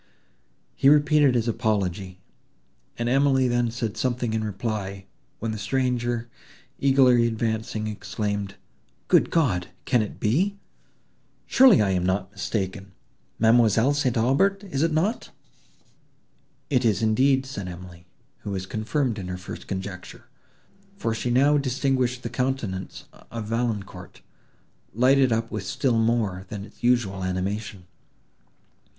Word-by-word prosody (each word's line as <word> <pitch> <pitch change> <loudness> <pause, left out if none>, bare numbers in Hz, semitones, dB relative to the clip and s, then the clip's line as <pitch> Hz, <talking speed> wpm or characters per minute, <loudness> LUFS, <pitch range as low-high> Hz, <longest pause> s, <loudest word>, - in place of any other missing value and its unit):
He 135 - +4
repeated 145 -2 +4
his 120 -1 +1
apology, 95 -4 -2 0.8
and 120 - -2
Emily 135 0 +3
then 120 -1 +1
said 115 -2 -4
something 120 -3 -1
in 110 -1 -1
reply, 100 -2 -4 0.3
when 115 0 -3
the 110 - -5
stranger 120 +1 -1 0.5
eagerly 130 -3 +4
advancing, 110 0 -2
exclaimed, 100 -1 -4 0.5
"Good - - +4
God! 100 - +1 0.2
can 125 - +3
it 105 - -6
be—surely 200 - +1
I 100 - +1
am 90 -1 0
not 95 +1 -1
mistaken—ma'amselle 110 +5 0
St. 130 -4 0
Aubert?—is 180 - +1
it 165 0 +2
not?" 180 +9 -1 1.4
"It 130 -2 +2
is 110 -3 +1
indeed," 130 +5 +3
said 105 -8 -6
Emily, 90 -1 -10 0.3
who - - -7
was 95 -2 -3
confirmed 115 +3 -2
in 90 - -6
her 90 0 -4
first 90 - -9
conjecture, 95 -1 -7 0.7
for 115 - -1
she 115 +2 -3
now 140 +4 +4
distinguished 130 -2 0
the 115 - -3
countenance 120 -7 -3 0.3
of 115 -2 -5
Valancourt, 115 -3 -4 0.7
lighted 130 +2 +4
up 115 0 -1
with 110 -3 -4
still 115 +5 0
more 110 -5 0
than 100 -1 -6
its 105 - -19
usual 120 -6 +1
animation. 95 +1 -3
115 Hz, 120 wpm, -25 LUFS, 100-130 Hz, 1.4 s, He